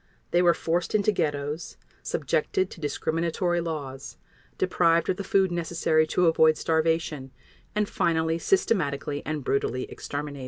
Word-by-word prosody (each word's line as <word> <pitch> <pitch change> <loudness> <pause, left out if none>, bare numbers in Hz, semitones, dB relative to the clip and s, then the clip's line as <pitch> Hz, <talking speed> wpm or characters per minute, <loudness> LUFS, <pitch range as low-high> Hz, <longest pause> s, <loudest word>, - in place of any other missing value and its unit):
They 175 - +4
were 175 -1 +5
forced 170 +4 -1
into 210 0 +3
ghettos, 150 -3 -3 0.2
subjected 380 -1 -1
to 170 - -11
discriminatory 170 +4 -1
laws, 145 -5 -6 0.4
deprived 170 -3 +2
of 185 - +1
the 200 - -4
food 195 -3 +2
necessary 165 -2 +1
to 180 +3 +2
avoid 160 -1 +4
starvation, 160 -4 0 0.5
and 210 -1 +1
finally 160 -2 0
systematically 145 - 0
and 155 -2 -3
brutally 130 -1 0
exterminated. 145 0 -5
165 Hz, 130 wpm, -26 LUFS, 150-175 Hz, 0.5 s, were